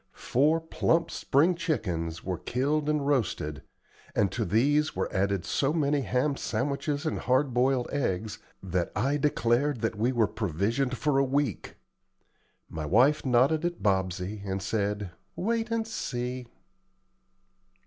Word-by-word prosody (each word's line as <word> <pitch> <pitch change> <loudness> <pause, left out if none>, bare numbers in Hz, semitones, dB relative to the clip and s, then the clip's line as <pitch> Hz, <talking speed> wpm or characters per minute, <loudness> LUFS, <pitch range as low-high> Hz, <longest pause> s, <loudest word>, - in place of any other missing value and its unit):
Four 150 +6 +2
plump 165 +1 0
spring 155 +7 +2
chickens 90 - -2
were 90 -2 -3
killed 145 +4 0
and 150 -2 +1
roasted, 110 - -1 0.5
and 100 - +2
to 115 - -1
these 140 - +2
were - - 0
added 100 -1 0
so 140 +2 +1
many 145 -3 +1
ham 135 +2 0
sandwiches 145 +2 -2
and 155 - -1
hard 130 +1 +1
boiled 125 0 +2
eggs, 110 -6 -2 0.2
that 90 -2 -1
I 135 +7 +1
declared 140 -2 +1
that 115 -1 -1
we 115 +5 +1
were 120 -3 +3
provisioned 110 - -1
for 145 -1 +1
a - - +4
week. 135 -4 -1 0.9
My 80 -2 -5
wife 125 - +4
nodded 130 +6 +3
at 175 0 -3
Bobsey, 95 0 0
and 95 -1 -2
said, 100 0 -2 0.2
"Wait 225 +4 -1
and 230 -1 0
see!" 125 - -4
125 Hz, 140 wpm, -28 LUFS, 100-145 Hz, 0.9 s, a